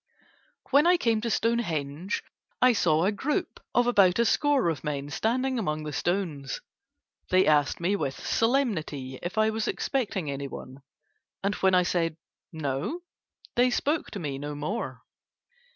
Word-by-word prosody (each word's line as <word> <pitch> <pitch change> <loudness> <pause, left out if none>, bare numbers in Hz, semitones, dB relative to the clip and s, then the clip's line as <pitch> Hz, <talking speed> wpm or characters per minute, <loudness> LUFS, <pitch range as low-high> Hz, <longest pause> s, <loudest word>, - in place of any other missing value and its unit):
When 290 +4 +6
I 355 0 +6
came 225 -8 +1
to 235 - -2
Stonehenge 185 -8 -1 0.4
I 255 -1 +6
saw 165 -5 +3
a 200 - +3
group 270 +9 -2 0.2
of 245 - +4
about 200 -7 +4
a 235 - +3
score 290 - +3
of 155 -5 -3
men 145 -1 -3
standing 255 - 0
among 155 -7 -2
the 150 -1 -5
stones. 165 -6 -2 0.7
They 185 +1 +4
asked 150 -2 +3
me 180 +4 +1
with 140 -8 -2
some - - -10
solemnity 175 - 0
if 175 +4 -5
I 220 0 +4
was 220 0 -2
expecting 200 - -1
anyone, 140 -1 -7 0.6
and 200 +1 +1
when 190 -2 +3
I 180 - +5
said 165 -3 0 0.3
No 155 - -3 0.5
they 245 +1 +4
spoke 295 +5 0
to 205 - -6
me 140 -5 -4
no 145 +1 -5
more. 155 +11 -4
185 Hz, 155 wpm, -27 LUFS, 150-235 Hz, 0.7 s, When